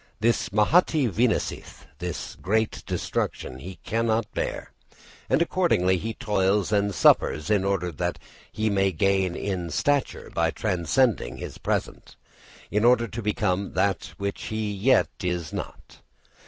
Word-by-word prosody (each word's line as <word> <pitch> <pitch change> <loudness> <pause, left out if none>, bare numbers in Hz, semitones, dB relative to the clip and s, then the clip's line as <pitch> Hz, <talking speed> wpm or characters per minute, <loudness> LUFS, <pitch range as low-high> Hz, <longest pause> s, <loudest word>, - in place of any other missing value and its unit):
This 115 -5 +1
mahatī 130 - +3
vinashtih 115 +4 -1 0.2
this 90 -2 -5
great 110 +3 0
destruction 65 - -3
he 90 +6 -8
cannot 115 0 0
bear, - - -3 0.6
and 135 +6 +4
accordingly 95 - +2
he 115 +3 -4
toils 105 -4 +1
and 100 -1 +2
suffers 75 +7 +3
in 100 -3 +3
order 95 -3 0
that 75 - -2 0.3
he 110 0 -1
may 95 -1 +2
gain 95 +1 +1
in 90 -4 -3
stature 140 - 0
by 85 0 +2
transcending 90 - 0
his - - -8
present, - - -3 0.6
in 105 +1 +1
order 120 -1 +4
to 115 - -5
become 100 -2 -1
that 95 -4 0
which 100 0 -4
he 110 -1 -2
yet 110 +7 +3
is 90 -4 -2
not. - - -7
100 Hz, 135 wpm, -25 LUFS, 90-115 Hz, 0.6 s, and